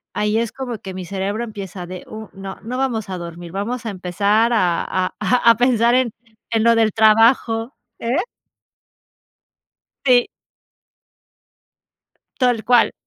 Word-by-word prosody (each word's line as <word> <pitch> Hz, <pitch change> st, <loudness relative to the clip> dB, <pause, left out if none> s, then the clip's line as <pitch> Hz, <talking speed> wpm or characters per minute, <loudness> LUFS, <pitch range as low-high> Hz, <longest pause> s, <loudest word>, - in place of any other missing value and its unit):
ahí 210 Hz, +1 st, +1 dB
es 230 Hz, -1 st, -1 dB
como 250 Hz, -4 st, -5 dB
que 190 Hz, 0 st, -8 dB
mi 185 Hz, -1 st, -6 dB
cerebro 200 Hz, +4 st, -3 dB
empieza 200 Hz, -5 st, -7 dB
de: 180 Hz, 0 st, -8 dB
"Uh, 220 Hz, -1 st, -8 dB
no, 195 Hz, 0 st, -7 dB
no 250 Hz, +3 st, -4 dB
vamos 230 Hz, -7 st, -1 dB
a 185 Hz, -, -4 dB
dormir, 170 Hz, 0 st, -8 dB
vamos 230 Hz, +5 st, -4 dB
a -, -, -2 dB
empezar 200 Hz, +5 st, +1 dB
a 175 Hz, -6 st, +2 dB
a 185 Hz, 0 st, -2 dB
a 245 Hz, -2 st, +3 dB
a 230 Hz, -, +1 dB
pensar 240 Hz, -1 st, +3 dB
en 255 Hz, -3 st, +2 dB, 0.4 s
en 225 Hz, -1 st, +1 dB
lo 235 Hz, 0 st, +5 dB
del 225 Hz, -2 st, +3 dB
trabajo". 225 Hz, +2 st, +3 dB, 0.2 s
¿Eh? 240 Hz, +5 st, -1 dB, 1.9 s
Sí. 245 Hz, -2 st, +5 dB, 2.1 s
Tal 245 Hz, -3 st, +2 dB
cual. 245 Hz, -1 st, +4 dB
220 Hz, 140 wpm, -20 LUFS, 195-235 Hz, 2.1 s, lo